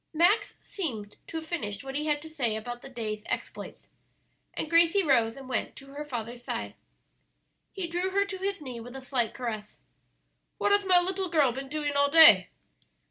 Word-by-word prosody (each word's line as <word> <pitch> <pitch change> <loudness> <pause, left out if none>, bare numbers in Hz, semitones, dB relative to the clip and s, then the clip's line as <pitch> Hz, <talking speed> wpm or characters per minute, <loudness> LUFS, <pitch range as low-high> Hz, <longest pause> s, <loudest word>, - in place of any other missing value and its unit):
Max 355 +7 +3
seemed 225 - -5
to 325 - -5
have 320 - -6
finished 210 - -4
what 270 0 -7
he 300 +2 -2
had 295 0 0
to - - -9
say 260 -9 -1
about 240 +2 -6
the 270 - -10
day's 220 -4 -5
exploits, - - -6 0.7
and - - -2
Gracie 335 +4 +4
rose 235 -6 +2
and 270 -1 -10
went 245 -4 -3
to 275 0 -13
her 295 +1 -5
father's 240 -3 -6
side. - - -4 1.0
He 385 -3 -4
drew 350 +2 -1
her 400 +1 +1
to 395 -1 -5
his 390 -4 -3
knee 250 -4 -6
with 245 +3 -10
a 270 - -7
slight 250 -3 0
caress. 220 -4 -5 0.8
"What 410 - +1
has 405 0 +4
my 365 -1 +6
little 375 +1 -1
girl 300 -6 +3
been 270 +2 -7
doing 295 0 -2
all 285 0 +3
day?" 320 +2 +8
285 Hz, 190 wpm, -28 LUFS, 240-340 Hz, 1.0 s, day